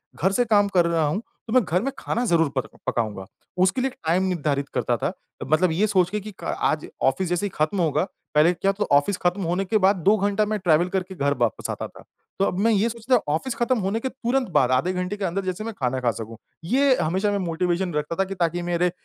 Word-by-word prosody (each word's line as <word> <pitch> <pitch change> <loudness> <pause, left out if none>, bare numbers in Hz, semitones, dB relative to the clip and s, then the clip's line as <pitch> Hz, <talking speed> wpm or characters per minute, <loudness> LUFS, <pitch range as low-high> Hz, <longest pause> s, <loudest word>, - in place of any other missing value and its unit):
घर 190 - +1
से 245 +5 +2
काम 205 -2 +4
कर 175 - +5
रहा 165 -2 +1
हूँ 185 +9 -1 0.3
तो 220 - -4
मैं 255 -2 +5
घर 180 0 0
में 275 - -1
खाना 240 +2 -1
ज़रूर 165 -7 +3
पर 130 - 0 0.2
पकाऊँगा। 105 -5 -2 0.4
उसके 190 +7 +2
लिए 265 - +1
एक - - -18
टाइम 180 +4 +3
निर्धारित 145 -6 -1
करता - - +1
था। - - -2 0.3
मतलब 155 +5 +2
ये 195 +7 +2
सोच 185 -3 +2
के 210 +2 -2
कि 210 +1 -8
क - - -2
आज 155 - 0 0.2
ऑफ़िस 135 +8 +2
जैसे 175 +3 0
ही 205 - -1
ख़त्म 155 +6 0
होगा 160 0 +1 0.3
पहले 155 +4 +5
क्या 195 +3 +1
तो 210 +1 -2
ऑफ़िस 145 +7 +3
ख़त्म 180 +3 +1
होने 180 +3 0
के 215 +3 +2
बाद 195 +1 +4
2 205 +2 +6
घंटा 205 +1 +1
मैं 215 +1 -1
ट्रैवल 175 -1 +3
करके 190 0 -3
घर 140 -3 +1
वापस 120 -4 -1
आता - - -4
था। - - -16 0.4
तो 195 - +3
अब 180 - -1
मैं 225 +3 +3
ये 215 +2 +2
सोचता 235 +2 0
हूँ 235 - +2
ऑफ़िस 235 +10 -3
ख़त्म 255 -1 +1
होने 200 +3 -1
के 260 - -3
तुरंत 255 -2 -1
बाद 130 -5 +3
आधे 135 +9 +2
घंटे 180 +2 -3
के 200 - -2
अंदर 190 +2 -2
जैसे 185 +3 -3
मैं 225 0 -5
खाना 130 -1 0
खा 120 -2 +2
सकूँ। 115 +1 -8 0.3
ये 265 +7 +3
हमेशा 190 +6 0
मैं 205 - 0
मोटिवेशन 175 0 -1
रखता 150 +2 -2
था 195 - +5
कि 195 +1 -6
ताकि 175 -1 0
मेरे 175 0 0
185 Hz, 250 wpm, -24 LUFS, 160-210 Hz, 0.4 s, 2